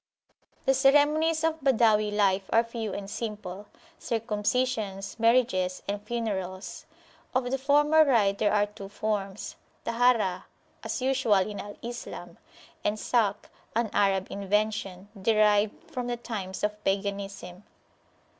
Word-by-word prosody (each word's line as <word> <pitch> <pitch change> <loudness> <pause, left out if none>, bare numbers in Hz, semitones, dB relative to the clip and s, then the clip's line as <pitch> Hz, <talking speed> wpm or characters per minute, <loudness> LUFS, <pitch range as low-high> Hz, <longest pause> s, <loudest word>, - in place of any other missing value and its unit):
The 270 - +4
ceremonies 295 +4 +3
of 320 0 +1
Badawi 225 -6 +3
life 200 -2 +1
are 230 - +5
few 230 -2 -5
and 195 0 -5
simplecircumcisions, 210 +1 -3
marriages, 225 -6 +2
and 200 0 -2
funerals. 200 -5 -4 0.5
Of 250 -1 0
the 270 - 0
former 295 +3 +5
rite 210 -8 +2
there 210 - +2
are 205 -1 +3
two 205 -1 -10
forms, 205 -1 -3 0.3
Taharah, 230 -6 +2 0.4
as 255 - -3
usual 260 -5 +2
in 210 -1 -6
Al 205 0 -8
Islam, 240 +1 -7 0.4
and 210 +1 0
Salkh, 210 -3 0 0.3
an 230 -2 0
Arab 195 -2 +2
invention, 200 -1 -1
derived 210 -1 +2
from 250 -1 -3
the 240 0 -2
times 200 -5 -6
of 210 0 -2
Paganism. 195 -2 -3
215 Hz, 120 wpm, -28 LUFS, 200-245 Hz, 0.5 s, are